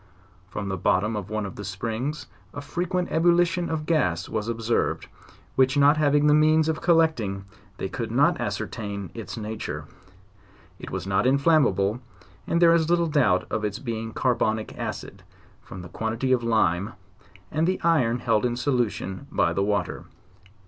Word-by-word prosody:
From 100 +1 -5
the 95 -1 -2
bottom 105 +6 +1
of 105 -2 -5
one 110 -1 -2
of 95 - -8
the - - -6
hot 100 - -6
springs 115 +9 -4 0.3
a 145 - -5
frequent 175 +5 -2
ebullition 175 +1 +2
of 155 -1 -3
gas 145 - +1
was 110 0 -3
observed, 115 0 -1 0.5
which 130 +1 +3
not 145 +2 +5
having 145 -1 +3
the 150 - +5
means 155 +1 +4
of 160 0 -1
collecting, 155 - +2 0.3
they - - -3
could - - -4
not - - +2
ascertain 100 -4 -4
its 115 0 -7
nature: 110 0 -5 0.9
it - - -8
was 95 -2 -4
not 95 +4 +1
inflammable, 130 - +3 0.5
and 170 - +1
there 170 -1 +6
is 165 -1 +2
little 170 0 +3
doubt 130 - +2
of 110 - -1
its 105 0 -2
being 115 -3 -4
carbonic 110 -3 0
acid, - - -6 0.4
from 95 -2 -10
the - - -8
quantity 115 +6 -2
of 125 -2 +3
lime, 110 -3 +1 0.6
and 160 +2 +1
the 185 - 0
iron, 135 -9 +3
held 110 -3 +1
in 120 -1 0
solu 125 -3 +1
tion 95 +8 -7
by 85 -4 +1
the 100 - 0
water. 100 +1 -1
120 Hz, 170 wpm, -25 LUFS, 105-155 Hz, 0.9 s, there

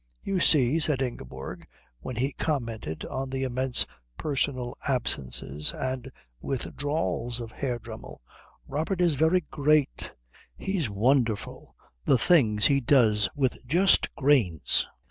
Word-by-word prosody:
"You 195 -2 -1
see," 150 -2 +5
said 150 -4 +1
Ingeborg 65 - -7 0.3
when 120 - -6
he 130 +4 -1
commented 115 - -3
on 135 0 -4
the 135 0 -2
immense 130 0 0 0.3
personal 130 -4 -2
absences 70 - -1
and 130 -1 -4 0.3
withdrawals 135 - -2
of 115 -2 -7
Herr 125 -1 -3
Dremmel, 110 -1 -10 0.5
"Robert 160 +6 -2
is 175 -3 +3
very 160 +6 +3
great. 150 -1 +1 0.5
He's 185 - -2
wonderful! 115 0 0 0.3
The 130 - +4
things 110 - +3
he 140 -1 +4
does 110 -6 +3
with 130 -3 -1
just 180 +8 +3
grains! 130 - +2
130 Hz, 120 wpm, -27 LUFS, 115-145 Hz, 0.5 s, see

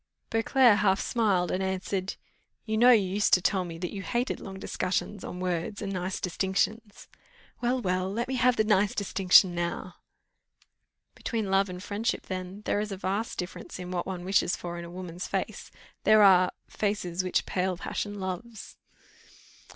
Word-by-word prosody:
Beauclerc 225 0 +4
half 195 -2 +3
smiled 200 -7 +1
and 185 - -1
answered 190 0 -2 0.5
"You 220 - -1
know 240 +3 +6
you 215 -6 +5
used 205 +3 +3
to - - +1
tell 190 0 +1
me 170 -2 -7
that 175 +1 -5
you 200 - -4
hated 240 +5 -1
long 190 -1 -8
discussions 190 +1 -2
on 180 - -6
words 180 +2 -2
and 195 -2 -4
nice 185 0 -3
distinctions." 200 +4 -2 0.5
"Well, 250 +1 +1
well, 185 -4 0
but 195 - -5
let 235 +2 -1
me 265 - -3
have 250 0 +4
the 220 - +3
nice 210 -2 +2
distinction 190 -2 +5
now." 175 0 -3 1.2
"Between 220 -5 -3
love 195 0 +3
and 180 +1 -7
friendship, 210 +3 -2
then, 185 +2 -6
there - - +1
is 210 0 -3
a 195 - -4
vast 200 +4 -2
difference 180 0 -6
in 180 0 -7
what 175 -1 -2
one 180 -2 -5
wishes 190 -2 +2
for 175 0 -6
in 170 - -6
a - - -9
woman's 180 0 -6
face; - - -3 0.3
there 215 -1 +6
are, 185 -2 +6 0.2
'faces 190 -4 -2
which 185 - 0
pale 185 -1 -1
passion 205 +3 -4
loves. 195 +4 -6
190 Hz, 175 wpm, -28 LUFS, 180-210 Hz, 1.2 s, know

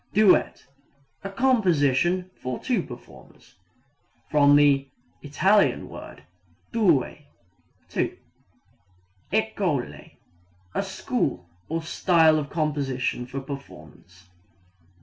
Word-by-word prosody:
Duet 210 -3 +3 0.6
a 195 - -4
composition 185 - +2
for 125 -1 -5
two 240 -7 -1
performers. 120 -5 -14 0.8
(From 145 -1 +5
the 140 -2 +4 0.3
It. 190 +8 +3
word - - -11 0.5
due 175 - +2 0.7
two.) - - -2 1.1
École 195 - -2 0.6
a - - 0
school 90 - -2 0.2
or 165 +1 -2
style 160 -1 +3
of 145 -1 -5
composition 135 -5 -2
or 135 +1 -4
performance. 130 -9 -11
150 Hz, 85 wpm, -25 LUFS, 135-185 Hz, 1.1 s, From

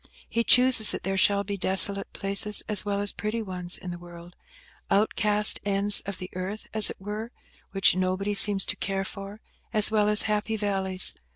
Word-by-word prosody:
He 230 - -3
chooses 250 -3 +4
that - - -2
there 195 0 -3
shall 200 +1 +1
be 200 0 -7
desolate 195 +1 +2
places 200 +1 +2
as 210 -3 +5
well 200 -1 -4
as 205 - -1
pretty 220 +2 -5
ones 180 -3 -5
in 180 - -9
the 175 - -9
world; 175 0 -15 0.5
outcast 210 0 0
ends 200 0 +3
of 200 -1 -7
the 185 - -10
earth, 190 +4 -7
as 215 -2 +4
it - - -10
were, 210 +4 -8 0.4
which 195 -2 +2
nobody 185 +2 -3
seems 200 -1 +3
to - - -2
care 195 0 -4
for, 200 +2 -10 0.3
as 215 0 +3
well 210 -1 0
as 210 0 +3
happy 210 +1 -3
valleys. 190 -3 +1
200 Hz, 185 wpm, -24 LUFS, 190-210 Hz, 0.5 s, as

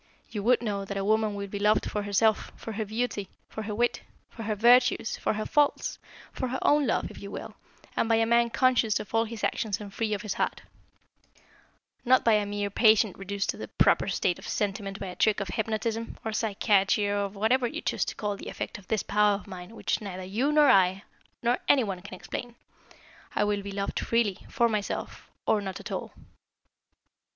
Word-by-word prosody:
You 210 -3 -3
would 240 +3 +3
know 200 -3 -2
that 195 0 -5
a 195 - -1
woman 215 0 +2
will 200 0 -4
be 200 +1 -5
loved 210 +1 +3
for 210 - -2
herself, 205 +2 +2
for 225 - -7
her 220 0 -3
beauty, 215 -2 -2 0.2
for 220 - -6
her 210 -1 -4
wit, 240 +2 +1 0.3
for 230 - -9
her 215 -1 -1
virtues, 240 +1 +4
for - - -1
her 215 0 -3
faults, 295 -1 +1 0.3
for 260 - -2
her 255 +1 -2
own 290 -2 +4
love, 225 - 0
if - - -11
you 200 - -7
will, - - -7 0.4
and 230 - +1
by 225 - +5
a 225 0 +3
man 235 +1 +3
conscious 230 -2 +2
of 210 - -8
all 225 0 +3
his 225 -1 -8
actions 210 -4 0
and 205 -2 -9
free 215 -1 -1
of 200 - -7
his 210 -3 -2
heart; - - -2 1.4
not 255 +1 +4
by 230 - +5
a 210 -1 +2
mere 205 0 -2
patient 215 -1 +4
reduced 200 +1 -2
to - - -11
the - - -6
proper - - +3
state 180 - 0
of - - -10
sentiment 200 -1 -2
by - - -4
a 180 -1 -6
trick 215 -2 +2
of 195 -3 -3
hypnotism, 225 +2 -2
or 220 - -2
psychiatry, 205 -2 +2
or 205 0 0
of 200 0 -2
whatever 240 +5 +2
you 310 +7 -5
choose - - -1
to - - -5
call 205 -1 -2
the - - -8
effect - - -5
of 190 - -18
this 220 - 0
power 210 0 +3
of 200 - -8
mine 185 +2 -9
which - - -1
neither 185 -3 -6
you, 225 +10 0
nor 300 -1 +5
I, 190 -5 +4 0.4
nor 240 +1 +2
any 270 -3 +5
one 195 -4 -4
can 190 0 -9
explain. 240 +5 -6 0.8
I - - +3
will 205 -1 0
be 200 0 -6
loved 200 0 -2
freely, 230 -5 +1
for 240 -3 +3
myself, 210 -3 -4 0.2
or 215 - +2
not 190 -2 -5
at - - -8
all." - - -4
210 Hz, 215 wpm, -28 LUFS, 200-230 Hz, 1.4 s, by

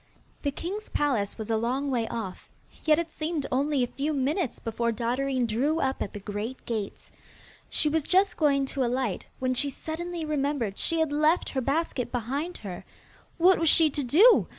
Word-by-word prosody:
The 285 - 0
king's 370 +9 -5
palace 240 -9 0
was 220 0 -4
a 220 - +3
long 260 +5 -1
way 235 -3 0
off, 220 -6 -6 0.4
yet 310 -1 +5
it 335 -1 -2
seemed 310 -2 -2
only 275 +1 +2
a 245 - -5
few 305 +2 +1
minutes 285 - 0
before 235 +1 -1
Dotterine 250 +3 0
drew 270 +9 +1
up 265 -2 -1
at - - -2
the 205 - -6
great 210 +5 -5
gates. 215 -4 -4 0.6
She 305 - +2
was 315 +2 +2
just 385 +2 +3
going 280 -3 +3
to 275 - 0
alight, 245 -4 -1
when 255 0 0
she 280 +3 +1
suddenly 330 +4 -5
remembered 280 -8 -1
she 330 -1 +2
had 320 -2 +1
left 305 +4 +2
her 265 - -1
basket 275 -1 -1
behind 275 +9 -3
her. 180 -3 -6 0.5
What 365 +3 +5
was 330 -1 +3
she 320 -1 +5
to 285 - -2
do? 370 - +6
275 Hz, 185 wpm, -27 LUFS, 235-315 Hz, 0.6 s, do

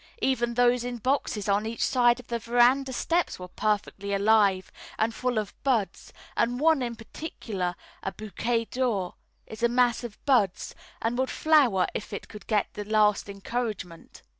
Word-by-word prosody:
Even 240 -3 +1
those 245 0 +3
in 245 0 -4
boxes 235 -4 -1
on 205 +2 +1
each 230 +1 -1
side 240 -1 +3
of 250 - -11
the 235 0 -3
verandah 245 +4 +3
steps 340 +7 0
were 180 - -8
perfectly 200 0 -1
alive 200 -2 +3 0.3
and 225 +1 +1
full 250 0 -1
of 215 -2 -2
buds, 240 -8 0 0.2
and 245 +2 +1
one 315 -1 +4
in 240 -1 -3
particular, 220 - -5 0.3
a 195 - -3
Bouquet 230 +3 -2
d'Or, 225 -8 -1 0.3
is 220 - -10
a 235 - +3
mass 245 0 +2
of 230 -3 -7
buds, 215 -10 +2 0.3
and 235 +2 0
would 260 - +1
flower 275 -12 +3
if 210 - -5
it 200 - -6
could 210 - -12
get 210 -3 0
the 210 - -5
least 210 -1 +2
encouragement. 200 -4 -5
230 Hz, 165 wpm, -27 LUFS, 205-245 Hz, 0.3 s, one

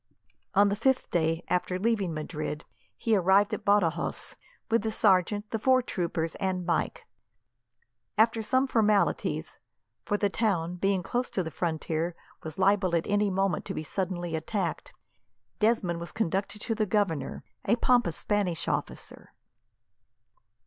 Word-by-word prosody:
On 200 +1 +6
the 200 - 0
fifth 265 +4 +1
day 165 0 +1
after 180 0 0
leaving 205 -3 0
Madrid 155 0 -4 0.3
he 225 -2 +2
arrived 195 +2 +4
at - - -3
Badajos, 200 -5 +1 0.3
with 230 -1 +2
the 220 - -1
sergeant, 205 0 +2
the 225 - -1
four 255 +2 +4
troopers, 165 -6 -2
and 185 -2 -1
Mike. 170 - -1 1.1
After 225 +1 +4
some 260 +5 +2
formalities 215 -5 +1 0.4
for 205 - 0
the 205 - +2
town, 180 -5 -1
being 195 0 +1
close 245 +6 -1
to 185 - -1
the 160 - -5
frontier, 165 +1 -2 0.3
was 155 -2 -7
liable 190 -2 +3
at 165 - +1
any 205 0 +2
moment 195 -3 0
to - - -4
be 155 - -3
suddenly 175 -1 -3
attacked 170 +2 -3 0.7
Desmond 210 -6 +1
was 170 - -7
conducted 200 +1 -2
to 230 - -1
the 215 -1 0
governor, 175 -9 -1 0.2
a 220 - +4
pompous 240 -8 +2
Spanish 200 -5 -1
officer. - - -4
195 Hz, 140 wpm, -28 LUFS, 170-210 Hz, 1.1 s, On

